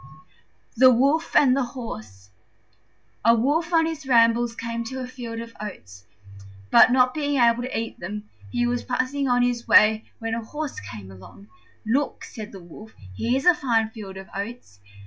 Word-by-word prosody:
THE 255 +3 +7
WOLF 280 +7 +1
AND 260 -3 +5
THE 275 - +1 0.2
HORSE 105 - -9 0.9
A 230 +1 +5
Wolf 300 +9 0
on 325 -1 +4
his 315 -3 -5
rambles 230 -1 +3
came 230 0 -4
to 260 +3 -6
a 255 - -4
field 240 -3 -7
of 230 0 -8
oats, 95 - -9 0.7
but, - - +7
not 250 0 +4
being 290 -2 -1
able 235 0 +4
to 250 -2 -3
eat 225 0 -6
them, 210 +4 -6 0.2
he 240 0 0
was 245 0 -1
passing 260 +3 -1
on 245 -1 +3
his 245 -1 -1
way 215 +1 +5
when 225 0 -4
a 230 0 -3
Horse 295 +5 -5
came 100 -2 -10
along. 95 +1 -15 0.4
"Look," 265 +6 -1
said 220 -3 -9
the 195 - -10
Wolf, 215 +6 -13 0.2
"here's 255 - -1
a 360 - +7
fine 225 -7 0
field 200 -4 -9
of 190 0 -9
oats. 200 - -7
235 Hz, 175 wpm, -24 LUFS, 215-255 Hz, 0.9 s, THE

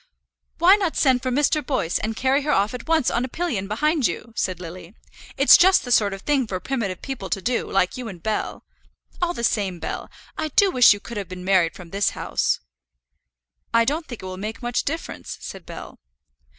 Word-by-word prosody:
"Why 370 +4 +6
not 375 -6 -1
send 260 -3 +3
for 255 - -2
Mr. 295 +3 +2
Boyce, 220 - -1
and 220 +1 -3
carry 265 +4 +2
her 295 - -4
off 205 -1 +2
at 250 +2 -7
once 320 -4 +2
on 240 - 0
a - - -2
pillion 255 - -3
behind 290 - +1
you?" 230 0 -6
said 185 -5 -1
Lily. 180 +2 -9 0.4
"It's 275 +1 +8
just 375 -2 +5
the 245 - -5
sort 205 -4 +4
of 195 0 -7
thing 275 -5 +1
for 185 -3 -3
primitive 200 -4 -3
people 260 -8 -5
to - - -1
do, 235 +5 -2
like 190 +2 +1
you 250 -2 -5
and 180 -6 -9
Bell. 215 -1 -2 0.6
All 350 0 0
the 235 - -5
same, 200 -6 0
Bell, - - -5 0.3
I 315 - 0
do 385 +6 +3
wish 250 -5 +7
you 205 - +2
could 235 +2 -8
have 200 -2 -5
been 180 0 -8
married 185 -4 +3
from 175 -3 -12
this 200 +1 +1
house." - - 0 1.2
"I 230 0 +5
don't 310 +6 -1
think 240 -6 -8
it - - -6
will 185 0 -6
make 220 +5 -6
much 240 0 -1
difference," 325 +3 -5
said 190 -3 -9
Bell. - - -9
235 Hz, 215 wpm, -23 LUFS, 195-280 Hz, 1.2 s, It's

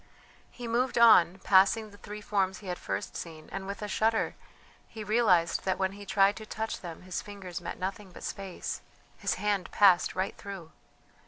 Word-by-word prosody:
He 245 -2 -8
moved 240 +2 0
on, 190 -6 +7
passing 205 +3 +4
the 205 - -15
three 210 +1 -8
forms 190 -2 0
he 210 - -13
had 180 -1 -4
first - - -4
seen, 160 -2 -8
and 195 0 -5
with 200 +1 -5
a - - -2
shudder 220 +2 +1 0.5
he 220 -2 -8
realized 205 -6 +3
that 190 -1 0
when 190 0 0
he 200 0 -11
tried 195 +1 +4
to 220 - -8
touch 220 +1 -4
them 170 -1 -8
his 185 -1 -4
fingers 190 -4 -7
met 170 - -5
nothing 190 +1 -5
but - - -12
space 195 -2 -5 0.3
his - - -1
hand 205 -3 -1
passed 190 -4 +5
right 190 +1 -1
through! 190 -5 -8
195 Hz, 185 wpm, -29 LUFS, 185-210 Hz, 0.5 s, on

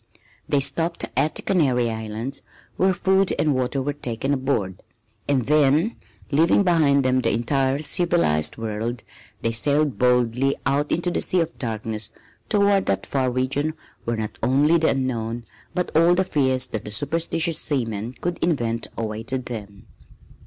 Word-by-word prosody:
They 145 - +3
stopped 165 +5 0
at 155 - +1
the - - -5
Canary 130 -10 +2
Islands, 110 +5 -5 0.3
where 190 +1 +3
food 190 +1 +2
and 150 -1 +2
water 130 +1 -1
were 145 +2 -1
taken 135 0 -3
aboard, 130 -9 -1 0.5
and 135 -4 +1
then, 150 - +3 0.4
leaving 165 +7 +4
behind 150 -7 +3
them 130 0 +3
the - - +1
entire 135 +3 +1
civilized 155 - +2
world, 115 +1 -4 0.4
they 115 - +1
sailed 140 0 +1
boldly 125 +2 +2
out 145 +2 +1
into 175 +1 0
the - - -1
Sea 185 - +2
of 165 0 -4
Darkness 110 -3 -3 0.4
toward 200 -1 +3
that 100 - 0
far 130 -2 0
region 135 +5 -1 0.3
where 115 0 -1
not 110 -1 -5
only 145 +7 +3
the 160 - +3
Unknown 120 -3 -2 0.3
but 180 -3 -2
all 170 +2 +5
the 190 - +2
fears 130 -6 +1
that 110 -3 -5
superstitious 165 - 0
seamen 115 -5 -2
could 175 0 -2
invent 115 -9 0
awaited 115 +3 -4
them. 100 -5 -8
135 Hz, 150 wpm, -23 LUFS, 115-155 Hz, 0.5 s, all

